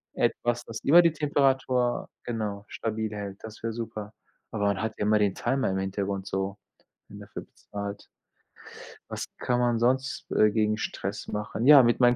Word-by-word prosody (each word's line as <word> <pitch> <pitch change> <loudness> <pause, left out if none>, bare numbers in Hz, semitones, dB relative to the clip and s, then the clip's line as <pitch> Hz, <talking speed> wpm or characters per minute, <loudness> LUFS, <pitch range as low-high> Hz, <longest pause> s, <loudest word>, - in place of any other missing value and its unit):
Etwas, 120 0 0
was 115 -1 -5
immer 170 +5 +8
die 165 -2 +4
Temperatur 135 -4 +1
genau, 105 -4 -3
stabil 110 -1 -3
hält, 100 -1 -5
das 110 -1 -9
wär 115 - -1
super, 110 -2 -6 0.4
aber 105 -2 -1
man 100 -1 +1
hat 110 0 -2
ja - - -1
immer 105 0 +4
den 100 -2 +2
Timer 135 -4 0
im 95 - -1
Hintergrund 95 0 -2
so, 95 +1 -2 0.5
wenn - - -11
dafür - - -8
bezahlt. 100 0 -8 1.0
Was - - -4
kann 125 0 0
man 120 -1 +2
sonst, 130 +3 +1
äh, 105 - +5
gegen 110 -1 +1
Stress - - -4
machen? 105 +4 -2
Ja, 145 -4 +10
mit 120 +1 +3
meinen 120 0 +5
110 Hz, 175 wpm, -27 LUFS, 105-125 Hz, 1.0 s, Ja